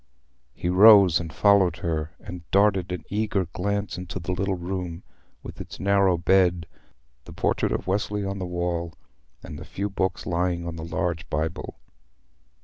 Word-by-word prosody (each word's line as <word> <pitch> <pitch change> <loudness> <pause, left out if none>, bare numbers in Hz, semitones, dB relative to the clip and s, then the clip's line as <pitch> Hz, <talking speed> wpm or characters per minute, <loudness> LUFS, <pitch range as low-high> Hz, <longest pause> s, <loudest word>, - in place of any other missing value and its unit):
He - - -4
rose 95 -1 +7
and 80 -2 -6
followed 90 +1 +3
her, 80 -1 -2
and 85 -1 -10
darted 95 -3 +2
an 90 -3 -4
eager 105 -2 0
glance 100 +3 -3
into 90 -1 -6
the 85 +1 -4
little 95 +1 -1
room 90 -1 -5 0.4
with - - -8
its - - -10
narrow 100 -2 +3
bed, 90 -1 +2 0.6
the - - -11
portrait - - 0
of - - -2
Wesley 100 +1 -1
on 100 0 -4
the 90 - -4
wall, 85 -1 -3 0.5
and - - -8
the - - -8
few 100 +1 -4
books 95 -1 -2
lying 85 -1 -1
on 85 -1 -5
the 80 - -7
large 85 +1 -3
Bible. 80 +2 -3
90 Hz, 160 wpm, -25 LUFS, 85-100 Hz, 0.6 s, rose